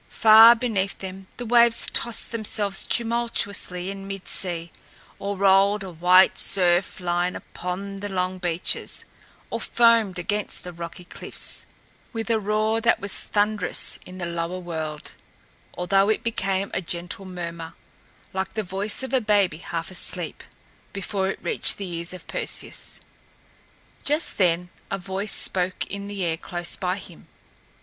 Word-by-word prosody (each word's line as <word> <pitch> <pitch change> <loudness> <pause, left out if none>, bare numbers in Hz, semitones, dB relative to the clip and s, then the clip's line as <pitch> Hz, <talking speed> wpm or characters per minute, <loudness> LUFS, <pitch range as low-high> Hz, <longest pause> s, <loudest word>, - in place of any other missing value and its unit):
Far 225 +2 +8
beneath 215 -5 -1
them 190 0 -8
the 245 - -5
waves 235 0 +5
tossed 235 -1 +1
themselves 210 -3 0
tumultuously 225 -6 0
in 195 0 -7
mid 195 -1 -7
sea, 170 -3 -2 0.5
or 200 0 -3
rolled 200 +1 +4
a 190 - -7
white 180 +3 +5
surf 180 -1 +2
line 175 0 0
upon 195 +2 -5
the 205 +1 -5
long 185 -1 -1
beaches, 175 -1 -1 0.5
or - - -2
foamed 230 -5 +3
against 205 +3 -2
the 180 - -8
rocky 170 +1 -8
cliffs, - - -4 0.5
with 225 0 -3
a 225 - +3
roar 215 +2 0
that 230 - +3
was 200 -1 +2
thunderous 205 -1 0
in 185 0 -11
the 180 - -3
lower 170 +1 -3
world, 160 -4 -5 0.6
although 195 +3 +3
it 220 - +1
became 195 -4 -1
a - - -1
gentle 175 +2 -4
murmur, 170 -3 -6 0.6
like 190 +2 -3
the 220 - -1
voice 195 +6 0
of 265 - -6
a 260 - +3
baby 200 -7 +2
half 170 0 -5
asleep, 185 - -2 0.5
before 195 0 -2
it - - -3
reached - - +5
the 200 - -5
ears 170 -1 -3
of 185 -2 -9
Perseus. - - -2 1.0
Just 300 -3 0
then 180 -1 +2 0.2
a 195 - -1
voice 195 +2 -3
spoke 185 0 0
in 200 0 -6
the 200 -3 -3
air 165 -1 -1
close 175 +1 -2
by 185 0 -2
him. 180 -4 -13
190 Hz, 150 wpm, -24 LUFS, 180-210 Hz, 1.0 s, Far